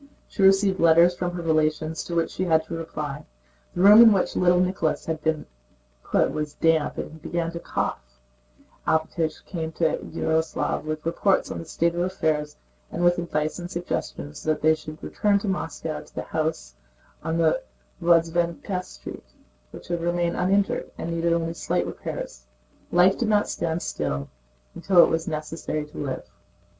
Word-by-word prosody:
She - - -5
received 195 0 +4
letters 170 +2 +6
from 180 0 -2
her 175 - -4
relations 155 0 0
to 170 - -4
which 165 -1 +1
she 185 - -2
had 160 -2 +3
to 170 - -8
reply; 150 -3 -5 0.5
the 175 - -1
room 210 +3 +10
in 230 -1 +9
which 195 -3 +1
little 180 0 +4
Nicholas 180 -3 0
had 160 -1 -3
been 160 -1 -1 0.6
put - - +1
was 150 -1 -4
damp 165 -2 +2
and - - -4
he 160 - -11
began 165 +1 -2
to 170 - -6
cough; - - -2 0.9
Alpátych 160 0 0
came 160 -3 -4
to 160 0 +1
Yaroslávl 160 -1 -1
with 155 0 -4
reports 185 +4 +1
on - - -4
the 165 - -7
state 170 +1 0
of - - -7
their 175 - +2
affairs 155 -5 -1 0.3
and 175 - -2
with 175 0 +4
advice 155 -1 -2
and 175 0 -6
suggestions 75 - -4
that 155 -1 -1
they 160 0 +6
should 155 0 -8
return 205 -1 +1
to 200 - -4
Moscow 165 -4 -3
to - - -19
the - - -3
house 155 - -3 0.5
on 160 +1 -1
the 160 -1 +2 0.4
Vozdvízhenka 170 +2 +1
Street, - - -11 0.4
which - - -12
had 170 -1 -1
remained 175 0 0
uninjured 195 +2 +1
and 170 - -4
needed 170 0 0
only 165 0 0
slight - - -1
repairs. - - -6 0.4
Life 180 +2 +4
did 235 - 0
not 210 -1 +3
stand 165 0 -2
still 70 -2 -3 0.4
and - - -10
it 180 -3 +6
was 165 0 -1
necessary 155 -1 -3
to 150 - -14
live. 135 -3 -4
165 Hz, 175 wpm, -25 LUFS, 155-175 Hz, 0.9 s, room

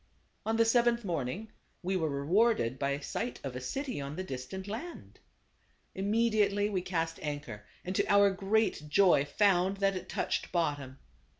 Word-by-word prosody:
On 225 0 +1
the 230 - +5
seventh 235 0 +3
morning 175 - -3 0.3
we 190 +2 0
were 160 -4 0
rewarded 140 - +2
by 140 0 0
i^oiWrecf 145 - -11
sight 245 - -3
of 135 -3 -5
a 125 - -4
city 255 - -3
on 140 +2 -5
the 185 - -3
dis 130 -7 -6
tant 190 +4 -7
land. 240 +12 -7 0.7
Immediately 210 0 +1
we 185 -2 0
cast 165 -2 -2
anchor, 145 -9 -5 0.2
and 185 +1 -3
to - - +1
our 200 0 +6
great 195 -5 0
joy 180 -4 +5
found 190 +4 +2
that 195 -1 +1
it 185 0 -6
touched - - -2
bottom. 145 -6 -1
185 Hz, 170 wpm, -31 LUFS, 145-210 Hz, 0.7 s, our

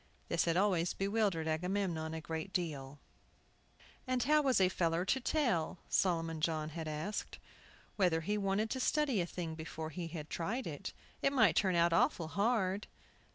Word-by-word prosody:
This 170 - +2
had 165 0 +2
always 180 -3 +2
bewildered 195 -5 0
Agamemnon 165 -1 -1
a 160 - -4
good 160 +4 -4
deal. 145 -6 -3 1.1
"And 255 -1 +1
how 300 +3 +4
was 265 -6 +3
a 190 - +5
feller 170 -1 0
to 265 - +2
tell," 240 - 0
Solomon 165 -3 +1
John 155 -1 0
had 160 0 -5
asked, 155 +7 -4 0.6
"whether 175 -5 +3
he 205 +6 -1
wanted 205 +2 0
to 260 - -1
study 275 -5 +2
a 170 - -2
thing 170 -2 -4
before 160 0 -6
he 170 +2 -4 0.2
tried 195 - -3
it? - - -5 0.3
It 275 - +2
might 220 - +5
turn 190 -3 +3
out 170 0 +4
awful 180 - +2
hard!" 200 0 +1
180 Hz, 160 wpm, -34 LUFS, 160-210 Hz, 1.1 s, a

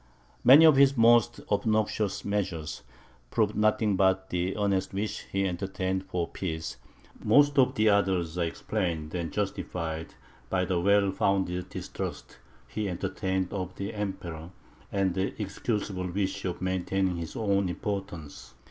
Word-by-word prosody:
Many 145 +6 +9
of 155 -4 +7
his 140 -1 +5
most 120 0 +5
obnoxious 105 -1 0
measures 90 -7 -2 0.5
proved 105 - +1
nothing 105 -1 +2
but 95 0 +2
the 90 +3 -1
earnest 100 -2 0
wish 105 +2 -3
he 95 0 +1
entertained 95 +1 -2
for 90 -3 -2
peace; 80 -3 -5 0.5
most 145 +5 +5
of 130 0 +4
the 110 -3 +3
others 95 -5 +1
are 90 - 0
explained 80 -1 -3
and 85 -2 -3
justified 85 -5 -3 0.3
by 90 -1 +1
the 90 -1 0
well 100 +1 +4
founded 95 -2 0
distrust - - -6 0.3
he 105 +5 -3
entertained 95 +1 -2
of 95 -2 -4
the 100 +2 -4
Emperor, 90 -6 -5 0.4
and 95 -2 +1
the 95 +3 -2
excusable 100 -2 -2
wish 95 +2 -2
of 90 -1 -3
maintaining 95 0 0
his 85 -1 -6
own 100 -4 +1
importance. 85 - -5
95 Hz, 140 wpm, -28 LUFS, 90-105 Hz, 0.5 s, Many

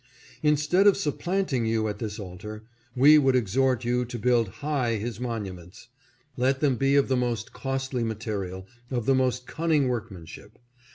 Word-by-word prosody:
Instead 150 +6 +3
of 200 - +6
supplanting 175 -6 -1
you 110 -1 0
at 105 -1 -4
this 105 -3 -4
altar, 105 +3 -8 0.3
we 145 +4 +7
would 135 -2 +3
exhort 125 +2 +1
you 125 +1 +1
to 120 0 -6
build 120 0 +2 0.2
high 135 -6 0
his 110 +2 -4
monuments; 105 -3 -6 0.5
let 130 +2 +1
them 140 -3 +2
be 135 +3 +2
of 140 - +4
the 130 - +1
most 120 -4 -2
costly 135 -2 -3
material, 105 -4 -4 0.2
of 120 -4 -2
the 135 - +4
most 130 -1 0
cunning 155 -3 +1
workmanship. 105 -4 -6
125 Hz, 160 wpm, -26 LUFS, 110-135 Hz, 0.5 s, we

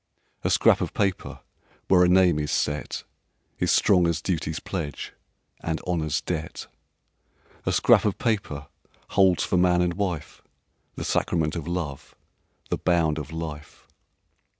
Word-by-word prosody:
"A - - +1
scrap - - +4
of - - -3
paper 95 -3 -1 0.5
where 90 -1 +5
a 90 - +4
name 90 -4 +4
is 75 -1 -2
set 75 +2 -2 0.6
Is - - +2
strong 90 -4 +4
as 85 -2 0
duty's 80 -2 -2
pledge 80 -6 -5 0.5
and 80 -1 -2
honor's 80 -4 -1
debt. 80 -2 -4 1.0
"A - - +3
scrap - - +5
of 105 - 0
paper 100 -11 -2 0.4
holds 95 -3 +4
for 90 - 0
man 90 0 +4
and 90 -1 0
wife 90 -6 -4 0.5
The - - -5
sacrament 80 -2 0
of 85 -2 -5
love, 85 -6 -4 0.6
the - - 0
bound 80 -3 +2
of 75 0 -7
life. 80 -2 -7
85 Hz, 140 wpm, -25 LUFS, 75-90 Hz, 1.0 s, where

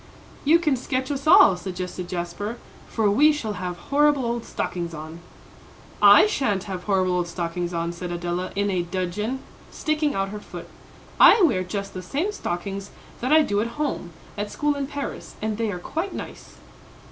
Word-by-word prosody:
"You 315 +4 +6
can 310 -5 +1
sketch 260 +2 -2
us 275 +1 -4
all," 195 - +8
suggested 180 0 -6
Jasper, 180 +6 -4 0.3
"for 220 -2 0
we 295 +9 +6
shall 240 -8 -3
have 180 -1 -4
horrible 285 +4 +2
old 235 0 -2
stockings 170 -2 -4
on." 155 +2 -8 0.8
"I - - +9
sha'n't 215 - 0
have 185 -3 -6
horrible 185 -3 +2
old 175 -1 -1
stockings 175 0 -3
on," 170 0 -2
said 175 +1 -6
Adela, 175 +1 -3
in 200 0 +1
a 185 -2 +1
dudgeon, 190 +8 -3 0.3
sticking 310 -2 -1
out 195 0 -1
her 210 +1 -6
foot. - - -9 0.5
"I 425 - +8
wear 230 - +3
just 195 +2 -5
the 185 - -5
same 290 - -2
stockings 195 - -4 0.3
that 255 +3 -2
I 310 0 +7
do 205 -6 0
at 235 +5 -4
home, 290 -12 -2 0.3
at 205 0 -2
school 295 +7 0
in 280 -1 -3
Paris, 285 0 -6
and 215 0 -3
they 225 -2 0
are 180 - -4
quite 325 - -4
nice." - - -9
205 Hz, 180 wpm, -24 LUFS, 180-275 Hz, 0.8 s, I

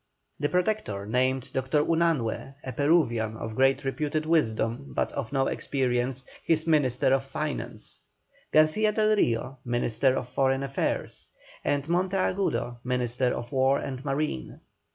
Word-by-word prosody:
The 145 0 0
Protector 180 - -1
named 130 +3 0
Dr. 130 +2 +1
Unanue, 160 -6 0
a 130 - -4
Peruvian 120 -6 +2
of 110 0 -5
great 135 +3 +2
reputed 150 +3 -1
wisdom 130 -4 0
but - - 0
of 135 -5 -4
no 135 -1 +2
experience, 130 -1 -1 0.2
his 160 -1 +2
Minister 135 -5 +3
of 135 0 +2
Finance; 135 -6 -5 0.5
Garcia 155 +8 +4
del 215 0 +3
Rio, 130 - 0
Minister 120 +2 +1
of 125 - -3
Foreign 135 +1 +1
Affairs; 135 0 -2 0.4
and 145 -1 0
Monteagudo, 185 -7 0
Minister 125 0 0
of 120 - -6
War 135 +1 +3
and 130 -1 -5
Marine. 135 - -2
135 Hz, 130 wpm, -27 LUFS, 125-155 Hz, 0.5 s, Garcia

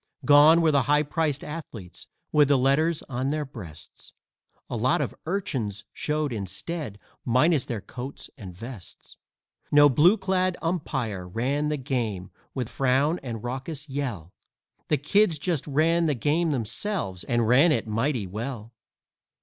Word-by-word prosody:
Gone 150 +3 +7
were 160 - +4
the 140 -2 +3
high 145 +3 +3
priced 150 -1 -1
athletes 125 - -8 0.2
with 150 -2 +5
the 140 -1 +4
letters 150 +5 +2
on 130 0 -2
their 150 0 -1
breasts; 100 - -12 0.5
A - - -5
lot - - +2
of - - -2
urchins 125 - -3
showed 150 -3 -1
instead, 105 - -5 0.3
minus 130 +4 +3
their 115 -4 -4
coats 130 +6 -8
and 100 -8 -9
vests 115 -3 -10 0.5
No 145 0 +7
blue 165 - +5
clad 185 -2 0
umpire 130 - -3
ran 135 +10 -1
the 150 - -1
game 115 -9 -3 0.2
with 125 -4 -2
frown 135 +7 +1
and 115 -5 -6
raucous 135 +5 -5
yell 120 - -4 0.5
The 150 - +2
kids 170 +4 +2
just 155 -1 -2
ran 165 +4 +2
the 150 - +1
game 155 +7 +1
themselves, 120 - -2
and 120 -2 +1
ran 135 +8 +5
it 115 -7 +1
mighty 115 +1 -1
well. 115 +3 -6
140 Hz, 145 wpm, -26 LUFS, 115-155 Hz, 0.5 s, Gone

